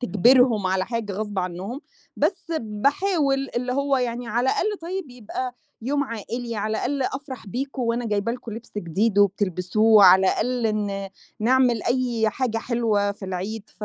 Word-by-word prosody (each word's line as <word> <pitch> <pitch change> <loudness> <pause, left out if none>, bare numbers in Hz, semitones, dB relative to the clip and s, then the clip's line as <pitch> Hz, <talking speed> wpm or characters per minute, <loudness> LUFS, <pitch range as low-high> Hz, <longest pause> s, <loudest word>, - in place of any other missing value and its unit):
تجبرهم 245 -1 +4
على 185 0 0
حاجة 230 -4 -3
غصب 205 0 -4
عنّهم، 185 +8 -4 0.4
بس 340 +5 0
باحاول، 275 - 0
اللي 250 +1 -1
هو 280 +1 +1
يعني 245 -1 -2
على 240 +3 0
الأقل 420 -1 -1
طيب 350 -4 -5
يبقى 245 +1 -5 0.3
يوم 285 +3 0
عائلي، 230 0 -5
على 215 +1 -2
الأقل 275 +1 -1
أفرح 265 -3 -5
بيكم 260 +5 -4
وأنا 235 +1 -1
جايبة 210 +2 0
لكم 240 -2 -7
لبْس 225 +2 -9
جديد 200 +4 0
وبتلبسوه، 205 +2 +4
على 185 +1 +8
الأقَل 245 +5 0
ن 195 -1 -3 0.3
نعمل 245 0 +3
أي 240 -3 +1
حاجة 235 -1 -1
حلوة 225 -4 0
في 200 - -10
العيد 195 +4 -5
ف - - -3
230 Hz, 155 wpm, -24 LUFS, 205-255 Hz, 0.4 s, على